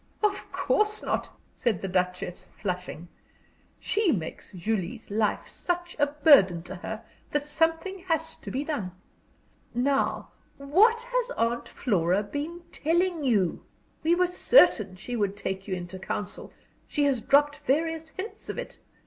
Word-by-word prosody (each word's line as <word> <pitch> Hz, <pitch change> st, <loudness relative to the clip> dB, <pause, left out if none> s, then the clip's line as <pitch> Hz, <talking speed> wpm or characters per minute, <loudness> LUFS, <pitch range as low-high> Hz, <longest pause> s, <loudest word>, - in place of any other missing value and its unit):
"Of 410 Hz, -1 st, 0 dB
course 425 Hz, 0 st, +1 dB
not," -, -, -1 dB, 0.3 s
said 230 Hz, -8 st, 0 dB
the -, -, -1 dB
Duchess, 180 Hz, -1 st, -1 dB
flushing. 180 Hz, -3 st, -4 dB, 0.7 s
"She 415 Hz, -5 st, +2 dB
makes 170 Hz, -, -4 dB
Julie's 205 Hz, +3 st, -3 dB
life 215 Hz, 0 st, 0 dB
such 350 Hz, 0 st, -3 dB
a 290 Hz, -, +4 dB
burden 285 Hz, -, +5 dB
to 185 Hz, -, -7 dB
her 220 Hz, +5 st, -6 dB, 0.3 s
that 295 Hz, 0 st, -1 dB
something 325 Hz, +5 st, 0 dB
has 320 Hz, -1 st, 0 dB
to -, -, -10 dB
be 270 Hz, +3 st, -2 dB
done. 220 Hz, -, -3 dB, 0.8 s
Now 275 Hz, +3 st, +1 dB, 0.3 s
what 415 Hz, +12 st, +4 dB
has -, -, -1 dB
Aunt 235 Hz, +1 st, 0 dB
Flora 190 Hz, -4 st, +1 dB
been 295 Hz, +10 st, -5 dB
telling 340 Hz, +1 st, +1 dB
you? 205 Hz, -10 st, +1 dB, 0.4 s
We 335 Hz, +2 st, +3 dB
were 360 Hz, +1 st, +3 dB
certain 350 Hz, -, +5 dB
she 240 Hz, +6 st, -5 dB
would 205 Hz, -3 st, 0 dB
take 190 Hz, -1 st, -4 dB
you 190 Hz, -, -1 dB
into 180 Hz, +1 st, -7 dB
council 200 Hz, +2 st, -4 dB, 0.4 s
she 295 Hz, -, 0 dB
has 275 Hz, -5 st, +2 dB
dropped 290 Hz, +3 st, +4 dB
various 320 Hz, +3 st, 0 dB
hints 385 Hz, +7 st, -8 dB
of -, -, -4 dB
it. -, -, -6 dB
275 Hz, 145 wpm, -27 LUFS, -, 0.8 s, burden